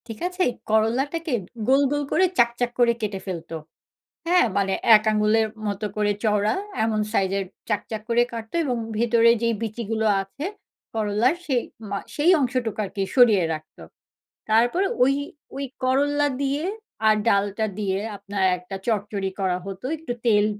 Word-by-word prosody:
ঠিক 225 -2 -8
আছে, 365 0 -1 0.3
করল্লাটাকে 265 +9 +1 0.3
গোল, 270 +2 +5
গোল 290 0 0
করে 370 - +4
চাকচাক 240 +1 +2
করে 240 -1 +5
কেটে 205 -2 -2
ফেলত। 170 -4 -6 0.8
হ্যাঁ? 360 +1 +5
মানে 195 -1 +1 0.2
এক 215 - +4
আঙুলের 215 +1 +3 0.2
মতো 205 +1 -2
করে 210 -1 +1
চওড়া 210 0 +2 0.3
এমন 220 -1 0
সাইজের 195 0 +1 0.3
চাকচাক 215 +1 -2
করে 235 +1 +4
কাটত 225 -1 -7
এবং 250 -3 -1 0.2
ভেতরে 230 0 +4
যেই 230 0 +2
বিচিগুলো 220 0 -2 0.2
আছে 195 +10 -7 0.5
করলার, 220 +6 +2
সেই 260 -6 +1 0.3
মা 200 - -2 0.2
সেই 310 +5 +4
অংশটুকু 245 -5 -1
আরকি 195 0 -3
সরিয়ে 225 -8 +6
রাখত। 155 0 -9 0.7
তারপর 240 - +3 0.2
ওই 270 +2 +3 0.4
ওই 275 - -3 0.2
করল্লা 285 +3 +2 0.2
দিয়ে 280 +3 -1 0.4
আর 215 - +6
ডালটা 205 +1 +1
দিয়ে 195 -2 0 0.2
আপনার 200 0 -4 0.2
একটা 180 +2 -8
চড়চড়ি 205 -3 -1
করা 185 -2 +1
হতো। 195 +3 -7
একটু 310 -5 -5
তেল 210 -2 +4
220 Hz, 145 wpm, -24 LUFS, 205-255 Hz, 0.8 s, সরিয়ে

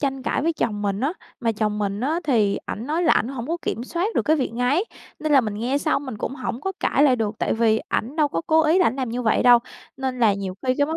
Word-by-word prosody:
tranh 270 -2 -2
cãi 270 - -1
với 335 - +1
chồng 220 -9 -2
mình 200 0 -1
á. 280 +6 0 0.3
Mà 230 -2 +1
chồng 210 -1 -1
mình 200 0 -2
á 310 +7 0
thì 220 -8 +2
ảnh 230 +5 -5
nói 320 +4 0
là 330 - +4
ảnh 225 - +1
hổng 255 -3 -5
có 335 - 0
kiểm 235 - -3
soát 350 - -2
được - - +2
cái 315 +1 +2
việc 260 -5 -2
ngáy, 255 - +1 0.3
nên 310 -1 -1
là 275 - +7
mình 215 -4 -4
nghe 245 +6 -1
xong 285 -1 -1
mình 220 - -5
cũng 265 - -3
hổng 255 -2 -4
có 385 - -3
cãi 280 - +2
lại 265 -4 +5
được, 220 -2 -2
tại - - 0
vì 225 -1 +3
ảnh 255 +8 -2
đâu 300 -2 +3
có 165 - -2
cố 320 0 +4
ý 320 +4 +4
là 365 - +4
ảnh 240 - 0
làm 260 -3 -2
như 245 +2 -3
vậy 225 - +2
đâu. 245 -1 +7 0.4
Nên 260 -1 -3
là 215 -4 +4
nhiều 195 -2 -5
khi 255 - +3
cái 285 - +3
vấn 320 - -2
255 Hz, 295 wpm, -23 LUFS, 225-295 Hz, 0.4 s, là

